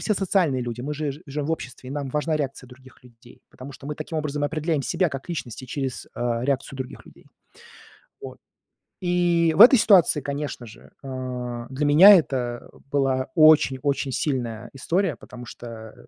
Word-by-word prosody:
все 215 - 0
социальные 175 -9 +1
люди, 120 0 -5
мы 145 +4 -4
же 145 -1 -3
жи 150 - -13
живем 145 +1 -4
в 165 - 0
обществе, 130 -4 -7
и 135 - -6
нам 140 -2 -4
важна 150 +2 -1
реакция 135 -3 -4
других 130 0 -17
людей. 120 0 -19
Потому 130 +2 -11
что 135 - -12
мы 150 - -4
таким 155 +1 -5
образом 145 -1 -3
определяем 155 0 -1
себя 180 +5 0
как 135 +4 -7
личности 130 -6 -6
через, 130 0 -4
а, 120 -1 -2
реакцию 135 0 -2
других 130 - -8
людей. - - -18 1.0
Вот. - - -9 0.6
И 175 -2 +2
в - - -1
этой 255 +1 +9
ситуации, 180 -8 +4
конечно 140 -3 -5
же, 110 +1 -15
а, 125 -2 -5
для 140 +3 -2
меня 185 +8 +9
это 125 -7 -2 0.2
была 135 -2 0
очень-очень 140 -3 +3
сильная 120 -7 -3
история, 175 +5 -1
потому 125 -1 -12
что 115 -2 -10
140 Hz, 170 wpm, -24 LUFS, 125-155 Hz, 1.0 s, этой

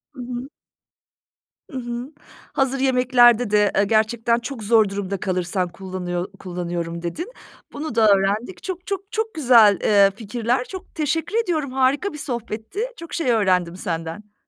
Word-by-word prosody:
I - - -12
hı. 245 +1 -5 1.2
I - - -16
hı, 240 +2 -5 0.4
hazır 270 0 +1
yemeklerde 245 -3 +4
de, 210 -1 +3
eee, 200 - +4
gerçekten 225 +2 +2
çok 240 -1 -6
zor 220 -1 +4
durumda 195 -1 -3
kalırsan 180 0 -1
kullanıyor 180 0 -4
kullanıyorum 175 -2 -4
dedin. 315 - -5 0.4
Bunu 290 -4 -5
da 225 -1 +5
öğrendik. 200 - -1
Çok, 370 -1 -5
çok, 395 +1 -4
çok 440 0 -2
güzel, 235 - +6
eee, 200 -2 +5
fikirler. 235 +3 -1
Çok 375 +5 -10
teşekkür 320 +6 -1
ediyorum, 310 - -2
harika 270 +8 +1
bir - - -7
sohbetti. 235 - -5 0.2
Çok 335 - -10
şey 305 -8 +1
öğrendim 185 -6 +2
senden. 170 +4 -5
230 Hz, 145 wpm, -22 LUFS, 195-270 Hz, 1.2 s, güzel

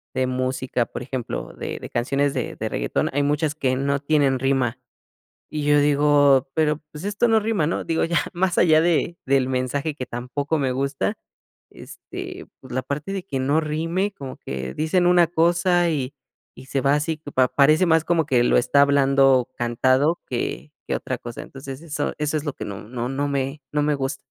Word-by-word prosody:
de 130 0 +1
música, 130 -1 -1
por - - -6
ejemplo, 125 -1 -5
de - - -5
de - - -8
canciones 140 +4 0
de 125 -4 -3
de - - -3
reggaetón, - - -1
hay 145 +1 +1
muchas 150 +1 0
que 130 -4 0
no 140 +1 0
tienen 140 -3 +2
rima. 130 -2 +1 0.7
Y 150 -1 -3
yo 145 0 +4
digo, 145 -2 +4
pero, 155 -1 +1
pues, 150 +3 -8
esto 205 +4 +1
no 225 -1 +5
rima, 210 -7 0
¿no? - - -2
Digo, 165 -1 0
ya 170 0 +1 0.2
más 180 0 0
allá 155 -3 +5
de 170 0 +1
del 135 -1 +2
mensaje 130 +4 -1
que 130 - -5
tampoco 140 +6 -3
me 135 -3 0
gusta, 135 -6 -2 0.5
este, - - -9
pues, 130 - -12
la 130 - -1
parte 150 +8 -4
de 190 -2 -4
que 140 -8 -3
no 145 +4 +2
rime, 165 +6 -1
como 135 -6 -8
que 65 -1 -5
dicen 175 +3 +1
una 175 -1 +5
cosa 175 +1 +2
y 140 -3 -2 0.4
y 130 - -12
se 135 0 -1
va 140 +1 +3
así, 150 +2 -1
pa 130 -1 +4
parece 155 +5 +4
más 160 -1 +3
como 170 -3 +1
que 125 -4 +3
lo - - +3
está 140 +3 +4
hablando 135 -2 +4
cantado 130 +6 +2
que 70 +4 -4 0.2
que - - +1
otra - - -4
cosa. 120 -1 -8
Entonces, 135 0 -9
eso 150 -3 -3
eso 150 +1 -1
es 150 - -2
lo 145 - -2
que - - -6
no 100 -1 -6
no 120 +2 -4
no 140 +2 -1
me 140 +1 -2
no 150 - +1
me 150 0 +2
gus 135 0 -2
140 Hz, 200 wpm, -23 LUFS, 130-155 Hz, 0.7 s, no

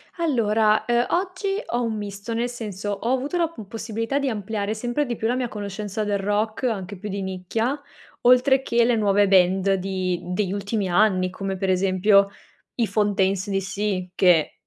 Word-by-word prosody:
Allora, 220 - +2
ehm, 240 0 +2
oggi 390 +3 -1
ho 240 - -1
un 225 -2 -1
misto, 205 +2 -5
nel 235 +2 -1
senso 210 -4 -5
ho 230 +5 -1
avuto 275 +6 -1
la 340 -1 +2
p 225 -11 -10
possibilità 225 +4 -3
di 280 -1 0
ampliare 210 -1 -3
sempre 240 +6 -1
di 240 -3 -3
più 220 - -2
la 245 - +1
mia 255 -1 -1
conoscenza 210 0 -4
del 205 -1 0
rock, 210 +4 -1
anche 200 -5 -2
più 205 +3 -7
di 195 0 -3
nicchia, 190 +9 -2 0.4
oltre 255 +2 +5
che 235 -2 +2
le 240 0 +3
nuove 205 -2 +3
band 190 +1 +4
di 185 -2 -1
degli 185 +2 -2
ultimi 200 0 -2
anni, 185 -1 +3
come 195 +1 -4
per 190 0 -1
esempio 195 +2 +4 0.5
i 235 -3 +1
Fontaines 200 -2 +1
D.C., 195 -1 -2
che 175 -5 +4
210 Hz, 175 wpm, -23 LUFS, 195-235 Hz, 0.5 s, oltre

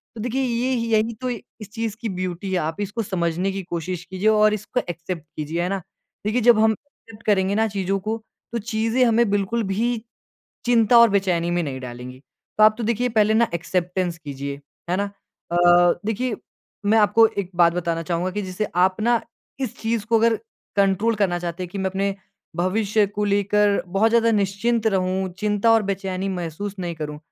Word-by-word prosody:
तो 220 - -6
देखिए 245 +4 -1
ये 250 +1 0
ह 230 - -1
यही 220 +1 +2
तो 255 - -1
इस 220 -3 -8
चीज़ 225 -3 -3
की 230 - -2
ब्यूटी 185 0 -4
है, 185 - +1
आप 160 0 -2
इसको 205 +3 -3
समझने 180 -1 -1
की 195 0 -4
कोशिश 175 0 -4
कीजिए 190 +3 -2
और 215 0 +4
इसको 215 +4 -2
एक्सेप्ट 170 -1 -5
कीजिए, 155 +3 -3
है 180 - -1
ना? 195 -1 -2 0.4
देखिए, 220 +4 +1
जब 230 -1 +6
हम 220 0 +5
एक्सेप्ट 220 -2 -12
करेंगे 200 -2 +2
ना 220 +1 +2
चीज़ों 195 -1 -1
को, 215 +3 -2 0.3
तो 235 - -2
चीज़ें 225 +3 0
हमें 235 -1 +3
बिल्कुल 205 +3 0
भी 225 +5 0 0.7
चिंता 235 -1 +5
और 235 - +8
बेचैनी 180 -4 +1
में 175 0 +1
नहीं 135 -4 -4
डालेंगी। 125 0 -8 0.4
तो 215 - +7
आप 215 0 +6
तो 235 - -2
देखिए 235 +2 +1
पहले 220 -2 +3
ना 230 +1 +3
एक्सेप्टेंस 180 0 -1
कीजिए, 140 -2 -6 0.3
है 180 - +2
ना? 200 +1 -1 0.4
अ - - 0
अ, 175 0 +6
देखिए 220 +1 -1 0.5
मैं 220 +2 +5
आपको 215 +2 +6
एक 190 -2 -2
बात 170 -1 +5
बताना 170 -1 -2
चाहूँगा 175 +2 -1
कि 205 +2 -3
जैसे 190 +2 -3
आप 185 +3 +2
ना 235 +1 +3 0.4
इस 260 -5 -3
चीज़ 225 -1 -1
को 225 0 +3
अगर 230 +1 +4 0.4
कंट्रोल 200 +3 +2
करना 195 -4 +1
चाहते 175 +1 -4
हैं 180 - -5
कि 200 - -6
मैं 190 - -1
अपने 195 +1 -1 0.4
भविष्य 205 +4 +1
को 205 +1 -3
लेकर 205 0 +2
बहुत 195 +5 +2
ज़्यादा 230 0 +4
निश्चिंत 215 +3 0
रहूँ, 190 -1 +1
चिंता 210 +1 +2
और 225 -1 +4
बेचैनी 195 -1 -3
महसूस 185 +2 -4
नहीं 175 -2 -3
करूँ। 150 -1 -6
200 Hz, 195 wpm, -23 LUFS, 180-220 Hz, 0.7 s, और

